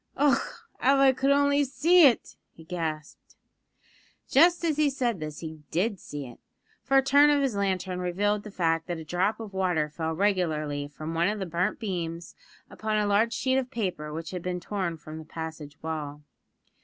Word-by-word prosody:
"Och! 285 0 +4 0.4
av 275 +2 +5
I 270 -1 +6
could 265 +2 0
only 285 0 +4
see 330 +4 +5
it!" 245 - 0 0.2
he 165 - -13
gasped. 160 -3 -5 0.9
Just 340 +5 +4
as 310 -3 +1
he 305 -1 +3
said 245 -7 -1
this 155 -1 -6
he 160 -1 -7
did 195 +3 0
see 145 -1 -7
it, 120 -2 -12 0.4
for 270 - +2
a 270 - +5
turn 285 +2 +6
of 290 -1 +3
his 260 -6 0
lantern 190 -2 -1
revealed 200 +4 0
the 210 - -9
fact 165 -4 0
that 175 -2 -3
a 160 - -7
drop 185 +7 0
of 215 -3 -8
water 175 -5 0
fell 160 +1 -3
regularly 155 -6 0
from 155 +3 -7
one 170 +2 +2
of 210 +1 -1
the 195 - -3
burnt 175 +1 -1
beams 170 -6 -4 0.3
upon 215 0 -2
a 210 - +2
large 205 +3 +2
sheet 260 +1 +1
of 255 -1 -4
paper 185 - -3
which 160 +1 -6
had 180 -2 -4
been 180 0 -3
torn 175 -2 -3
from 155 0 -9
the - - -8
passage 155 -2 -7
wall. 150 -2 -5
185 Hz, 190 wpm, -27 LUFS, 160-240 Hz, 0.9 s, I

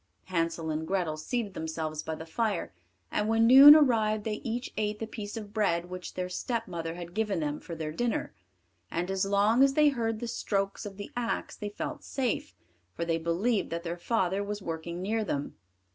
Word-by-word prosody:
Hansel 165 -2 -1
and 155 +1 -3
Grethel 180 -5 0
seated 205 +6 -3
themselves 160 -1 -3
by 160 - -4
the 160 - -8
fire, 195 - -1 0.4
and 210 - 0
when 225 0 +4
noon 275 +5 +11
arrived 220 -8 +3
they 215 -1 -3
each 240 0 -3
ate 210 0 -1
the 225 - -4
piece 215 -1 -6
of 210 -2 -8
bread 175 -5 0
which 185 0 -7
their 180 0 -2
stepmother 180 -5 -3
had 175 0 -8
given 210 -3 0
them 150 -1 -2
for 170 - -8
their 155 -1 -4
dinner; 235 +8 -1 0.6
and 175 +3 -2
as 195 0 +1
long 205 +5 +3
as 275 0 +5
they 300 -1 +6
heard 225 -5 -1
the 240 - -4
strokes 195 -3 -2
of 195 -1 -10
the 205 - -7
axe 245 -1 -2
they 210 -2 -5
felt 205 - -5
safe, 255 -5 -2 0.4
for 170 - -2
they 165 -1 0
believed 185 +7 0
that 170 +1 -4
their 170 0 -3
father 190 0 0
was 205 0 -4
working 170 0 -5
near 220 +3 0
them. 145 -8 -3
200 Hz, 195 wpm, -29 LUFS, 170-225 Hz, 0.6 s, noon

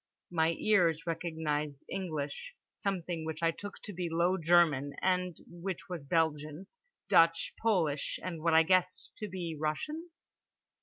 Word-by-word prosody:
My 165 -1 +2
ears 170 -7 +3
recognised 155 -4 -2
English, 155 -7 -4 0.2
something 175 -4 -3
which 160 +1 -5
I 165 - +4
took 205 +4 -8
to 205 - -6
be 175 -1 -3
low 170 +3 +2
German 160 -5 +3
and 180 -2 0
which 175 +1 -6
was 165 -6 -5
Belgian, 155 +1 0 0.4
Dutch, 165 0 +4
Polish, 170 -10 +1
and 170 -3 -4
what 165 0 +3
I 160 - +8
guessed 185 +1 +1
to 210 - -4
be 175 -4 -4
Russian. 300 - -3
165 Hz, 140 wpm, -32 LUFS, 155-185 Hz, 0.4 s, I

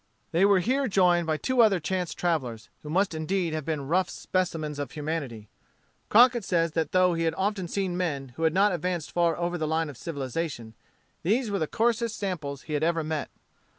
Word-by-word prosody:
They 175 +3 +4
were 200 -2 +5
here 265 +7 +1
joined 180 -4 +3
by 155 -1 +1
two 255 - +2
other 205 -5 +4
chance 180 +1 -2
travellers, 130 -10 -2
who 150 - -9
must 185 +3 +1
indeed 165 +1 -1
have 155 -2 -3
been 150 -4 -3
rough 180 +4 +2
specimens 160 -5 -2
of 145 -3 -3
humanity. 145 -8 -4 0.6
Crockett 240 +1 +6
says 170 -3 +1
that 160 -1 -1
though 185 -1 +4
he 165 0 -1
had 160 - 0
often 195 -2 -1
seen 190 0 -2
men 145 -7 -2
who 125 +6 -10
had 160 -1 +3
not 200 +2 +4
advanced 175 -2 -2
far 170 -2 +2
over 175 0 -2
the 155 - -1
line 160 0 0
of 135 - -14
civilization, 135 -5 -4 0.5
these 220 +5 +1
were 200 - 0
the 155 - 0
coarsest 230 +2 0
samples 150 -9 -4
he 155 - -6
had 150 - 0
ever 165 0 +1
met. 155 -1 -3
170 Hz, 200 wpm, -27 LUFS, 155-190 Hz, 0.6 s, Crockett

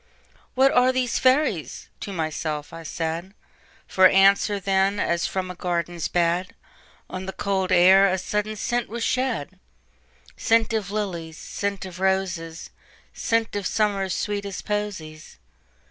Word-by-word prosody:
"What 265 +1 +5
are 250 +1 +4
these 255 -2 0
fairies?" 255 - +1
to 200 - -6
myself 155 -3 -3
I 165 - -7
said; 165 +4 -4 0.5
For 185 0 +6
answer, 200 +2 +4
then, 195 +1 +1
as 170 0 0
from 185 -1 -3
a - - -9
garden's 175 -2 -2
bed, 175 +1 0 0.5
On 185 0 -6
the - - -2
cold 190 -1 -1
air 190 +2 +7
a 190 0 +1
sudden 210 +3 -2
scent 240 +2 -2
was 230 +1 -4
shed,—Scent 65 - -2
of 210 -4 -1
lilies, 175 -6 -4
scent 200 -1 -4
of 185 -1 -9
roses, 185 -4 -1 0.4
Scent 230 -2 0
of 200 -2 -1
Summer's 200 -4 0
sweetest 200 -2 -3
posies. 190 -7 -5
190 Hz, 130 wpm, -24 LUFS, 170-210 Hz, 0.5 s, air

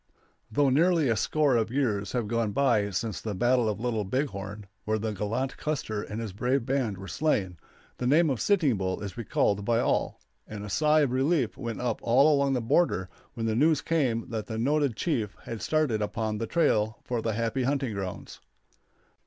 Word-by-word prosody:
] - - -42
Though 140 +4 +3
nearly 165 0 +3
a 115 - +2
score 145 +4 +2
of 115 -1 +1
years 110 -6 -1
have 120 -4 -1
gone 115 -1 -1
by 115 -5 +2
since 105 +2 -3
the 105 -3 -4
battle 120 +2 +2
of 105 - -2
the 110 - -8
Little 115 -4 0
Big 130 +9 -1
Horn, 100 0 -7 0.2
where 110 0 0
the 110 +1 -2
gallant 110 +7 -2
Custer 125 -9 -2
and 105 +2 -6
his 110 -4 -5
brave 125 +4 0
band 130 -7 -1
were 95 +1 -9
slain, 95 - -1 0.4
the 125 - -1
name 155 +3 +4
of 130 - -2
Sitting 160 - +2
Bull 95 +1 -2
is 100 -3 -6
recalled 100 -3 0
by 115 +2 +2
all; - - 0 0.3
and 105 -1 -7
a 105 - -7
sigh 155 +7 +3
of 140 -4 +1
relief 135 -1 +1
went 115 -4 -5
up 120 -3 -1
all 135 +6 +4
along 140 -1 +2
the 125 - 0
border 115 - +1 0.3
when 115 - -3
the 110 - +1
news 150 +5 +3
came 130 -9 0
that 110 0 -3
the 110 -2 -4
noted 140 +1 +1
chief 110 - -1
had 115 -2 -6
started 150 -9 +1
upon 110 0 -2
the 115 - -2
trail 110 -9 +1
for 120 -2 -2
the 110 0 -1
happy 115 +4 -1
hunting 135 -2 0
grounds. 95 -2 -6
115 Hz, 205 wpm, -28 LUFS, 105-140 Hz, 0.4 s, name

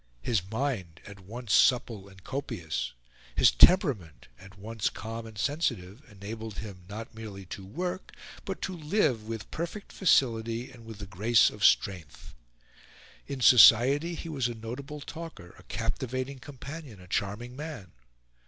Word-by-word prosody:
His 110 -6 +1
mind, 110 - -2
at 100 -1 -11
once 110 +3 -5
supple 115 -6 +3
and 95 -1 -17
copious, 85 - -3 0.4
his - - +6
temperament, 90 - +4
at 95 +2 -14
once 110 +2 -2
calm 115 +2 -6
and 110 -2 -12
sensitive, 110 - -1
enabled 110 +1 -7
him 95 -5 -8
not 110 +4 -7
merely 105 -4 -8
to 100 - -8
work, 180 - -4 0.3
but 195 -2 -5
to 190 - -3
live 150 - 0
with 110 -2 -6
perfect 170 +5 -5
facility 120 - +2
and 120 -3 -14
with 110 -2 -8
the 100 - -7
grace 105 +5 +4
of 105 - -8
strength. 90 -7 +2 0.9
In 140 -2 -5
society 130 +8 +7
he 165 - -7
was 140 -6 -1
a 120 - -5
notable 135 +7 -7
talker, 160 - -9
a - - -15
captivating 130 +2 -3
companion, 140 - -9
a 90 - -14
charming 105 +6 -3
man. 145 - -7
115 Hz, 145 wpm, -29 LUFS, 100-140 Hz, 0.9 s, society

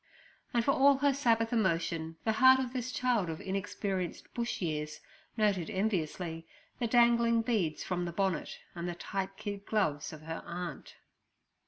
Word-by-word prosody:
And 235 -1 +1
for 275 - +4
all 275 0 +5
her 285 0 +3
Sabbath 230 -4 +2
emotion, 165 -6 0
the 220 - +2
heart 260 +4 +7
of 255 -1 -3
this 255 -1 -3
child 245 -8 +1
of 160 - -4
inexperienced 190 -1 -3
Bush 235 -1 -2
years, 155 -3 -3 0.4
noted 200 -6 +1
enviously 175 -5 -2 0.3
the 235 - 0
dangling 235 -1 +4
beads 200 -10 0
from 180 -1 -2
the 170 - -3
bonnet 190 -2 -1 0.2
and 175 0 -4
the 175 - -4
tight 195 +2 -4
kid 200 -1 -5
gloves 175 -10 0
of 155 -1 -10
her 165 +1 -5
aunt. 175 -4 -6
195 Hz, 160 wpm, -31 LUFS, 170-235 Hz, 0.4 s, heart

